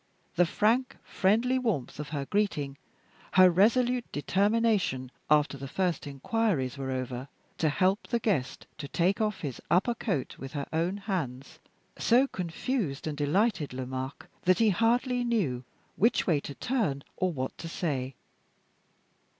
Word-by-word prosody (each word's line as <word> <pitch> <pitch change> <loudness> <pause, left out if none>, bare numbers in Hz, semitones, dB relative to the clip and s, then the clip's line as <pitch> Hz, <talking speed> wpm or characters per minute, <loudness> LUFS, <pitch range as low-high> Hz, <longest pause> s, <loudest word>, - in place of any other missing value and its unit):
The 175 0 +3
frank, 235 +8 +1
friendly 230 +7 +2
warmth 195 - -2
of 150 - -5
her 140 -2 -3
greeting; 145 -8 -1 0.5
her 185 -1 +7
resolute 240 +6 +3
determination, 195 - +1 0.2
after 150 -2 +3
the 135 - -5
first 180 +1 -1
inquiries 140 - 0
were 135 -1 -4
over, 130 0 -3 0.3
to 160 - +3
help 190 +7 +1
the 235 - +1
guest 195 - -1
to 145 - -5
take 185 +7 +1
off 210 -2 -1
his 140 -5 -5
upper 190 +8 +3
coat 195 - -3
with 135 +2 -7
her 140 -2 -3
own 170 +5 0
hands, 155 - -4 0.4
so 245 +3 +5
confused 180 - -3
and 155 -2 -2
delighted 150 - +1
Lomaque, 130 +1 -5 0.2
that 185 0 +5
he 225 0 +4
hardly 245 +4 +2
knew 185 - 0 0.3
which 230 +5 +3
way 160 -5 +3
to 140 0 -8
turn, 215 - -1
or 185 -1 +1
what 130 -4 -4
to 165 - -6
say. 135 -7 -2
175 Hz, 145 wpm, -29 LUFS, 140-220 Hz, 0.5 s, her